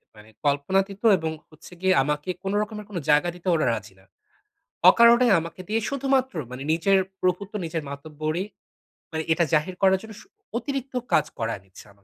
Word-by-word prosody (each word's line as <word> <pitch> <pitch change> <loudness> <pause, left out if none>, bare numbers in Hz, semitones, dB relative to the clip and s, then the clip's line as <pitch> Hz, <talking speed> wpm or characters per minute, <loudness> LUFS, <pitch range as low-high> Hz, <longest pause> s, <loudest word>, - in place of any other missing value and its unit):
মানে 105 0 -15 0.2
কল্পনাতিত 190 +8 0 0.2
এবং 160 -2 -3 0.2
হচ্ছে 155 +2 -15
গিয়ে 190 0 +4
আমাকে 150 +4 -2
কোনো 195 +1 -1
রকমের 210 0 -5
কোনো 185 -4 -4
জায়গা 150 +4 +4
দিতে 180 +1 -11
ওরা 155 - +1
রাজি 110 -2 -6
না। 95 - -23 0.8
অকারনে 235 +4 +6
আমাকে 170 +2 -8
দিয়ে 225 +1 +1
শুধুমাত্র 270 -1 0 0.2
মানে 125 +2 -6
নিজের 190 +4 +3 0.2
প্রভুত্ব 185 +2 -1
নিজের, 160 -1 -3
মাতব্বরি 155 +4 -4 0.7
মানে 160 0 -2
এটা 170 - +2
জাহির 155 +4 +1
করার 190 -1 +4
জন্য 220 0 -10
শু - - -19 0.3
অতিরিক্ত 270 0 -4 0.2
কাজ - - +4
করায়ে 115 -4 -2
নিচ্ছে 95 - -15
আমাকে 100 0 -30
180 Hz, 170 wpm, -25 LUFS, 150-205 Hz, 0.8 s, অকারনে